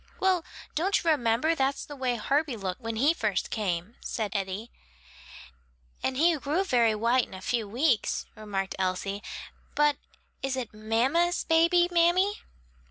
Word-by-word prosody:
"Well, 375 -3 +2 0.3
don't 370 +6 +2
you 330 - +3
remember 250 +2 +2
that's 275 -2 0
the 290 - -9
way 255 -3 0
Herbie 275 +3 0
looked 185 -3 -4
when 225 0 -4
he 280 +8 +3
first 215 - -1
came?" 190 -1 -2
said 215 -4 -3
Eddie. 195 +3 -3 1.3
"And 260 - -1
he 335 +3 +4
grew 295 +7 0
very 235 - +3
white 235 +4 +2
in - - -10
a - - -7
few 225 0 -1
weeks," 245 +1 +1
remarked 200 -3 -3
Elsie. 190 +2 -1 0.5
"But 295 -1 +3 0.4
is 270 0 -1
it 245 -5 -4
mamma's 250 +12 +1
baby, 335 +2 +4
mammy?" 355 +4 +3
250 Hz, 150 wpm, -28 LUFS, 215-320 Hz, 1.3 s, he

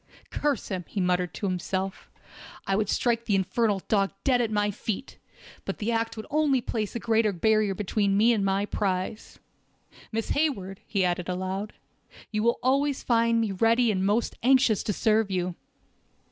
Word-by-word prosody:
Curse 290 -6 -1
him!" 185 -3 -3
he 205 - -4
muttered 180 -1 +1
to - - -4
himself, 190 +1 -3 0.6
"I 195 - +1
would 210 0 0
strike 235 -1 +1
the 205 - +2
infernal 195 +1 +1
dog 200 -3 +2
dead 250 -3 +3
at 230 - 0
my 205 -1 +1
feet, 220 +5 -5 0.4
but - - -4
the 220 +2 -2
act 225 0 -1
would 220 - -6
only 295 -3 +3
place 220 -3 -3
a - - -1
greater 225 -1 +2
barrier 210 +2 +2
between 200 0 0
me 230 +3 +5
and 210 -3 0
my 195 +1 +1
prize. 195 +1 -3 0.7
Miss 225 0 -2
Hayward," 200 -11 -1
he 195 -3 +1
added 180 0 -1
aloud, 190 +3 -3 0.6
"you 210 -1 0
will 235 +2 +2
always 275 +2 +1
find 230 -1 +2
me 220 -3 -1
ready 225 +4 +3
and 190 -2 -1
most 210 +4 +1
anxious 255 -4 +4
to - - -2
serve 215 +1 +2
you." 180 -1 -1
210 Hz, 175 wpm, -27 LUFS, 195-230 Hz, 0.7 s, me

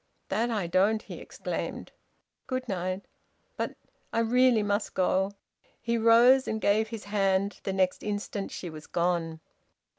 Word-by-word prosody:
"That 225 +5 0
I 210 -6 -1
don't!" 200 +6 +2
he - - -9
exclaimed. - - -5 0.6
"Good 255 -1 -3
night." 185 0 -3 0.5
"But - - -3 0.2
" - - -42
"I - - -3
really 240 -1 +4
must 205 +1 -1
go." 190 +1 +1 0.5
He 235 0 -1
rose 235 +3 +6
and 220 - -1
gave 215 +1 +2
his 225 -2 -7
hand. 200 -1 0
The 195 - -1
next 185 -1 +1
instant 205 -1 -3
she 180 - -6
was 155 0 -10
gone. 170 -2 -1
205 Hz, 150 wpm, -28 LUFS, 185-230 Hz, 0.6 s, rose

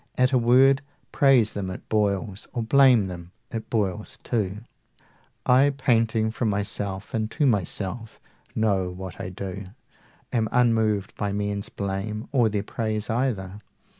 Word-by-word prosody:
at 125 +1 +3
a 130 - +4
word 130 +3 +5 0.3
Praise 130 -6 +4
them, 100 -2 -3
it 95 - -8
boils, 100 -1 -1
or 120 - -2
blame 125 -3 +5
them, 90 -1 -8 0.2
it 115 -2 -5
boils 105 -2 -2
too. 105 -3 -2 0.8
I, 130 +3 +5
painting 115 -4 +2
from 115 0 -1
myself 100 -1 -2
and 110 -1 -1
to 150 +5 0
myself, 110 0 -2 0.4
90 - - -2
Know 95 -4 +1
what 90 -1 -8
I 90 - -4
do, 95 +1 -6 0.7
am 110 -3 +1
unmoved 110 -5 +2
by 105 -1 -1
men's 100 0 -2
blame 100 +2 -4
Or 120 -5 +3
their 105 -1 -2
praise 110 -1 -3
either. 105 -6 -2
110 Hz, 145 wpm, -25 LUFS, 100-120 Hz, 0.8 s, word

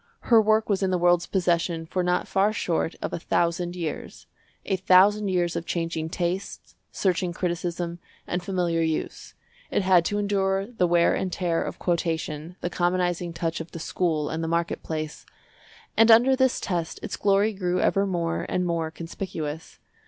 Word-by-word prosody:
Her 225 -1 +8
work 215 +1 +2
was 200 -2 0
in 190 - +1
the 185 - +1
world's 175 0 +3
possession 170 -3 0
for 180 +3 -2
not 180 0 0
far 195 +2 +2
short 170 -5 -1
of - - -3
a - - -2
thousand 175 +1 0
years—a 180 +3 -6
thousand 195 +3 +5
years 175 -2 0
of 165 - -4
changing 165 -2 -2
tastes, 180 +3 -4 0.2
searching 180 -2 0
criticism, 175 -1 -3 0.3
and 180 - -2
familiar 175 -3 0
use. 160 -1 -3 0.3
It - - 0
had 185 -2 +5
to 205 - -1
endure 195 -1 0
the 220 -5 0
wear 170 0 +4
and 185 - -2
tear 175 -2 0
of - - -4
quotation, 165 -2 -2
the 175 - -2
commonizing 175 -1 0
touch 165 0 -3
of 165 - -10
the 165 - -6
school 160 -2 -1
and 160 +1 -3
the - - -2
market 170 +1 -1
place. 155 -1 -5 0.7
And 225 +1 +5
under 240 +4 +7
this 260 -1 +2
test 170 -4 -3
its - - -4
glory 200 +2 +2
grew 180 -2 -1
ever 200 0 +2
more 170 -3 -2
and 180 - 0
more 165 -2 -1
conspicuous. 165 -1 -6
175 Hz, 170 wpm, -25 LUFS, 165-190 Hz, 0.7 s, Her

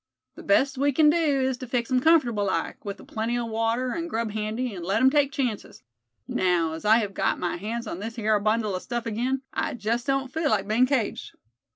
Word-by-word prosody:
The - - -11
best 265 +7 +2
we 285 +1 +3
kin 300 +2 +5
do 305 -5 +2
is 260 -1 0
to 255 - -8
fix 245 +1 -2
him 255 - +4
comfortable 250 -9 +3
like, 190 - -2
with 200 -1 -6
a - - -12
plenty 225 +2 -2
o' 240 - -2
water 230 +3 -1
and 335 +3 -3
grub 225 -4 -2
handy, 215 +3 -3
and 180 -3 -7
let 190 +4 +1
him 265 0 +5
take 285 -1 +2
chances. 250 -7 -3 0.4
Now, 180 -9 +1
as 160 +5 -8
I 220 +2 +6
hev 205 -4 -2
got - - 0
my 175 -1 -2
hands 230 +5 -4
on 180 -4 -5
this 225 +3 -6
hyar 215 -2 +1
bundle 215 0 0
o' 185 - -2
stuff 240 +3 -4
again, 250 +4 -1
I - - -2
jest 235 +3 -2
don't 270 -1 -1
feel 320 -2 0
like 200 -4 +1
bein' 235 +4 +3
caged." 255 -5 -2
235 Hz, 230 wpm, -25 LUFS, 215-265 Hz, 0.4 s, I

